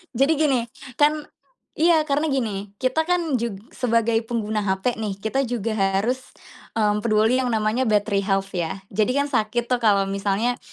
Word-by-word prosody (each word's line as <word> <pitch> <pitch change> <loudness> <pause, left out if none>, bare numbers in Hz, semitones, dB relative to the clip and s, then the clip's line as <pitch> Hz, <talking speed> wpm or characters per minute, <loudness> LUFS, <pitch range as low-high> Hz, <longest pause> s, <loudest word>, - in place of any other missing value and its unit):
Jadi 275 +6 +3
gini, 285 -4 +2 0.4
kan 300 +1 +3 0.5
iya 320 -1 +3
karena 295 +1 0
gini, 210 -8 -2
kita 260 +8 0
kan 335 -8 +1
jug 235 -3 -3 0.2
sebagai 230 -2 +1
pengguna 220 -2 -1
HP 200 +4 -1
nih, 210 -3 -3
kita 265 +4 0
juga 230 -2 -2
harus, 200 +4 +1 0.6
mmm, 210 -1 +2
peduli 220 +3 +2
yang 255 - 0
namanya 225 +2 0
battery 205 -1 +2
health 195 0 -1
ya. 175 +2 -3
Jadi 215 +4 +1
kan 285 0 0
sakit 235 0 -1
tuh 250 - +2
kalau 205 -4 +3
misalnya, 200 +5 -1
225 Hz, 160 wpm, -23 LUFS, 205-260 Hz, 0.6 s, Jadi